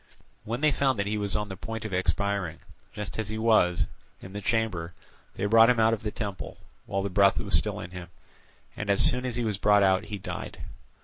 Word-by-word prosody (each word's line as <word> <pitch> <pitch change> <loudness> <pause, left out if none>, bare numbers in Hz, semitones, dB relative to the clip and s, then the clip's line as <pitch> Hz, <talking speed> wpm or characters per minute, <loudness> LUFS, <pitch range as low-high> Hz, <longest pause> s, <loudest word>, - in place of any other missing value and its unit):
When 120 +4 -3
they 155 -1 +4
found 135 -2 +1
that 100 - 0
he 105 +1 -1
was 100 -1 0
on 105 0 -1
the 95 - -7
point 110 +3 -6
of 105 - -5
expiring, 95 -2 -1 0.3
just 105 +1 -6
as 110 -1 -2
he 110 - -3
was, 110 -6 +3 0.3
in 95 - -11
the 105 - -5
chamber, 95 -6 -1 0.4
they 95 - -2
brought 115 +2 +6
him 125 -2 +3
out 110 0 +4
of 110 - -2
the 110 - -2
temple, 100 -3 -6 0.3
while 95 0 -1
the 100 - -2
breath 100 +1 +4
was - - -3
still 105 +6 +1
in 90 -4 -8
him, 90 -1 -8 0.7
and 110 - -5
as 100 - +5
soon 125 +1 +1
as 120 - -3
he 120 - -1
was 105 -3 -2
brought 105 -1 +5
out 95 +1 +3
he 105 -1 -5
died. 95 - -7
105 Hz, 230 wpm, -27 LUFS, 95-110 Hz, 0.7 s, brought